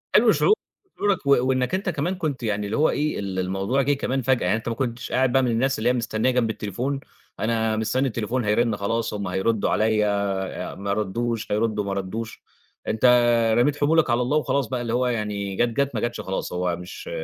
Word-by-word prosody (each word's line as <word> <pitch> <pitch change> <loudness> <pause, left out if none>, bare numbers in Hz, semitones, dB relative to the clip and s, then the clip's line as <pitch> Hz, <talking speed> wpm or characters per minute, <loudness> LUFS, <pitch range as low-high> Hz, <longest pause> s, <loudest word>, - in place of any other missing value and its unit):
حلو - - +6
شعور 425 - +4 0.4
شعورك 200 -7 0
و - - -1 0.2
وإنك 130 +5 +1
أنت 190 0 -2
كمان 170 +3 -1
كنت 155 -8 -3
يعني 105 -2 -1
اللي 100 - -2
هو 155 - +4
إيه، 150 +1 -1
ال 95 -2 -3
الموضوع 95 +8 0
جِه 140 +2 +2
كمان 135 -1 -1
فجأة، 130 0 +1
يعني - - +2
أنت 115 - -5
ما 115 - -2
كنتش 125 0 -3
قاعد 130 -1 +2
بقى 135 +1 +4
من 125 - +1
الناس 130 +4 +1
اللي 115 +3 +2
هي - - +3
مستنيّة 115 0 0
جنب 125 -3 +1
التليفون، 120 +6 -3 0.4
أنا 110 0 0
مستنّي 125 +5 +1
التليفون 120 +1 -2
هيرِن 110 +1 +2
خلاص، 115 +3 -1
هُم 100 -1 -3
هيردّوا 100 +4 0
عليَّ، 110 -1 +2
آآ 100 -2 -2
ما 100 0 -2
ردّوش، 110 +3 -2
هيردّوا 105 0 0
ما 100 0 -3
ردّوش، 105 +4 -5 0.5
أنت 110 +2 0 0.5
رميت 145 +4 +3
حمولك 155 0 +3
على 120 0 +2
الله 130 +5 +1
وخلاص 140 -3 0
بقى، 125 +2 -3
اللي 115 -1 -3
هو 125 +1 +2
يعني 105 -4 -2
جات، 120 +4 +2
جات، 140 +4 -1
ما - - -1
جتش 120 0 -2
خلاص، 95 -1 -4
هو 90 -1 0
مش 90 +1 -9
115 Hz, 210 wpm, -24 LUFS, 105-130 Hz, 0.5 s, حلو